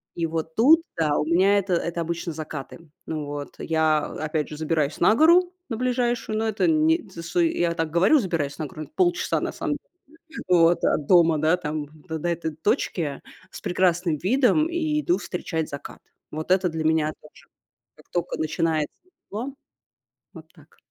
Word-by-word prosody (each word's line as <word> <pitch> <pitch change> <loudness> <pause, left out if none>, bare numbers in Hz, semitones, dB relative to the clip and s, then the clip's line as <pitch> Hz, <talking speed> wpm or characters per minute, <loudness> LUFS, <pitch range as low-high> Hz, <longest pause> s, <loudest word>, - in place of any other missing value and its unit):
И 170 - -1
вот 160 0 -4
тут, 310 +9 +6 0.2
да 150 -3 +1
у 150 - 0
меня 190 +5 +4
это 190 -2 -2
это 170 0 -2
обычно 170 0 -3
закаты. 155 0 -7 0.3
Вот, 145 -2 -5
я 160 -1 +2
опять 155 0 -3
же 150 - -7
забираюсь 155 -2 -1
на 180 - +5
гору 350 +4 +5 0.2
на 225 - -3
ближайшую, 240 -3 -1
но 225 - 0
это 215 +7 0
не 320 -4 +2
тшт 165 -1 -9
я 170 0 +2
так 165 -2 -2
говорю: 190 - +4
"Забираюсь 165 - -2
на 155 - -2
гору", 155 +3 -8
полчаса 355 -1 +1
на - - -2
самом - - -3
деле 355 - -42 0.5
вот 170 -1 +4
от 145 - +1
дома, 170 -3 +5
да, 160 +4 +3
там 150 -1 -4 0.2
до 160 0 -3
до 175 - -2
этой 160 -2 -3
точки 160 - -1 0.3
с - - -9
прекрасным 175 -2 +1
видом 265 - +2
и 315 -3 0
иду 350 +4 +1
встречать 160 -3 -4
закат. 140 - -8 0.3
Вот 155 +4 -4
это 185 -1 +3
для 160 0 -3
меня 155 -1 +2
тоже. 150 - -18 0.5
Как - - -20
тока 175 -1 -2
начинается 155 -1 -1 0.3
тепло. 240 +7 -5 0.8
Вот - - -11
так. - - -21
170 Hz, 170 wpm, -24 LUFS, 155-220 Hz, 0.8 s, тут